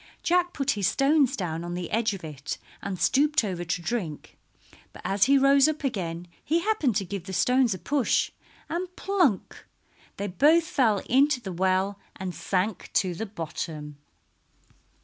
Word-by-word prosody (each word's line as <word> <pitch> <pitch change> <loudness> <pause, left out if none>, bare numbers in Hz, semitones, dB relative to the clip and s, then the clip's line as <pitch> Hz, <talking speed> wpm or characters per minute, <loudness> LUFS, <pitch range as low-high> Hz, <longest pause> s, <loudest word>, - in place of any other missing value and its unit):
Jack 355 0 +2
put 280 -3 0
his 200 -4 0
stones 275 -1 +3
down 165 -3 -3
on 175 0 -4
the 175 -1 -5
edge 220 -2 +1
of 190 - -11
it 145 -3 -6 0.2
and 195 -2 -4
stooped 285 - +3
over 185 -4 -3
to 170 +1 -2
drink, 175 -6 -4 0.6
but - - -12
as 195 0 +3
he 275 +2 +5
rose 275 +1 +5
up 310 -1 -2
again 175 -9 -3 0.2
he 330 +3 +1
happened 335 - +1
to 195 -2 0
give 190 -1 -6
the 190 - -5
stones 250 +1 +3
a - - -7
push, 265 - +1 0.4
and 360 +2 -4
plunk! 360 - 0 0.5
they 200 - -3
both 295 - +4
fell 230 - +1
into 275 +2 +3
the 195 -6 -6
well 190 +2 +1 0.2
and 185 -1 -5
sank 190 +3 -2
to 185 -3 +1
the 220 +6 -5
bottom. 155 -5 -6
205 Hz, 170 wpm, -26 LUFS, 180-280 Hz, 0.6 s, he